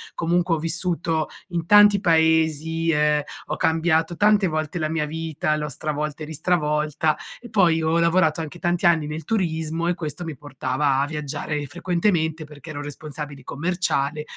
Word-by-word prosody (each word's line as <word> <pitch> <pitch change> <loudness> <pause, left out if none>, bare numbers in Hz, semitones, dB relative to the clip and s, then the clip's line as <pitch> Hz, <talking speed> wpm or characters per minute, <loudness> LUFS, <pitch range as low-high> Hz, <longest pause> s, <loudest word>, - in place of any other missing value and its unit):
comunque 170 0 +1
ho - - -2
vissuto 165 -1 -1 0.2
in 170 -2 -2
tanti 205 0 +7
paesi, 160 -1 +2
ehm, 150 -1 +2 0.3
ho 150 - -2
cambiato 160 +1 +1
tante 205 0 +4
volte 155 +1 -2
la 155 - 0
mia 155 -1 -1
vita, 160 -1 -2
l'ho 150 0 -3
stravolta 150 0 -3
e - - -4
ristravolta 150 -1 0 0.2
e 240 - -11
poi 170 -6 +3
ho 160 +1 +2
lavorato 170 -1 +3
anche 160 +2 -7
tanti 175 0 0
anni 165 -3 +4
nel 155 +1 -6
turismo 165 -4 -1
e 175 - +2
questo 155 -1 -5
mi 160 -3 -5
portava 135 0 -1
a 140 - +2
viaggiare 150 0 -4
frequentemente 165 0 0
perché 150 +1 -13
ero 145 -1 -5
responsabile 145 -1 -7
commerciale 150 -2 -1
160 Hz, 160 wpm, -23 LUFS, 150-170 Hz, 0.3 s, tanti